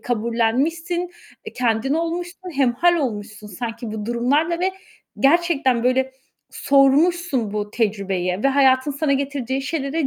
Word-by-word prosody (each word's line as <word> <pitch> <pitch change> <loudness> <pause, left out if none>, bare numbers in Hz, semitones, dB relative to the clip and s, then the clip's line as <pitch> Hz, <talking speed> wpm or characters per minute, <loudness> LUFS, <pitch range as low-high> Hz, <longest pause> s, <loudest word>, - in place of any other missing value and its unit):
kabullenmişsin, 255 +10 -1 0.4
eee, - - -7
kendin 245 +3 0
olmuşsun, 350 +2 -4
hemhâl 275 +7 +3
olmuşsun 215 -7 -4
sanki 225 +3 -6
bu 215 -1 -5
durumlarla 285 +9 +1
ve 375 +1 +1 0.5
gerçekten 275 -5 +2
böyle, 260 +1 +1 0.4
sormuşsun 280 - +2
bu 210 0 -3
tecrübeyi 195 -4 -1
ve 275 - +4
hayatın 270 0 +3
sana 280 +1 0
getirdiği 270 -1 -2
şeylere 285 +1 -2
265 Hz, 120 wpm, -21 LUFS, 230-320 Hz, 0.5 s, ve